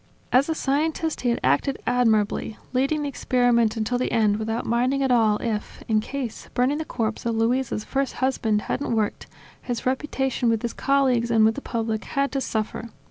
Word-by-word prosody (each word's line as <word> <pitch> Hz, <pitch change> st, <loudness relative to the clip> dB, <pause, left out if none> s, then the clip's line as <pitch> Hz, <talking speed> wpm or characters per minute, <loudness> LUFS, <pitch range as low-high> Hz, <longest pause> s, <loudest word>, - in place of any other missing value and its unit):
As 265 Hz, +5 st, +4 dB
a 320 Hz, -, 0 dB
scientist 315 Hz, +3 st, -1 dB
he 245 Hz, -, +1 dB
had 235 Hz, -, +1 dB
acted 275 Hz, -2 st, +2 dB
admirably, 220 Hz, -3 st, +1 dB, 0.2 s
leading 275 Hz, +4 st, +1 dB
the -, -, -1 dB
experiment 245 Hz, -4 st, +2 dB
until 235 Hz, +3 st, 0 dB
the 255 Hz, -, -1 dB
end 210 Hz, -2 st, +3 dB
without 225 Hz, +2 st, -2 dB
minding 255 Hz, +4 st, +1 dB
at 265 Hz, -, +1 dB
all 220 Hz, -3 st, +4 dB
if 215 Hz, -2 st, -4 dB
(in 220 Hz, -1 st, +3 dB
case 255 Hz, -1 st, -5 dB
burning 260 Hz, +4 st, +2 dB
the 315 Hz, -, -3 dB
corpse 225 Hz, -5 st, -2 dB
of 230 Hz, -1 st, -1 dB
Luisa' 235 Hz, +3 st, +1 dB
s 210 Hz, -, -4 dB
first 270 Hz, +2 st, -1 dB
husband 235 Hz, -5 st, 0 dB
hadn't 270 Hz, -4 st, -2 dB
worked) 215 Hz, -2 st, -1 dB, 0.3 s
his 245 Hz, -2 st, -4 dB
reputation 265 Hz, -2 st, 0 dB
with 225 Hz, -1 st, 0 dB
his 235 Hz, -, -2 dB
colleagues 260 Hz, -4 st, +2 dB
and 225 Hz, -2 st, +4 dB
with 220 Hz, -, +4 dB
the 280 Hz, -, -6 dB
public 225 Hz, -3 st, -2 dB
had 275 Hz, 0 st, -1 dB
to 270 Hz, -, -1 dB
suffer. 225 Hz, 0 st, -3 dB
245 Hz, 190 wpm, -24 LUFS, 225-270 Hz, 0.3 s, As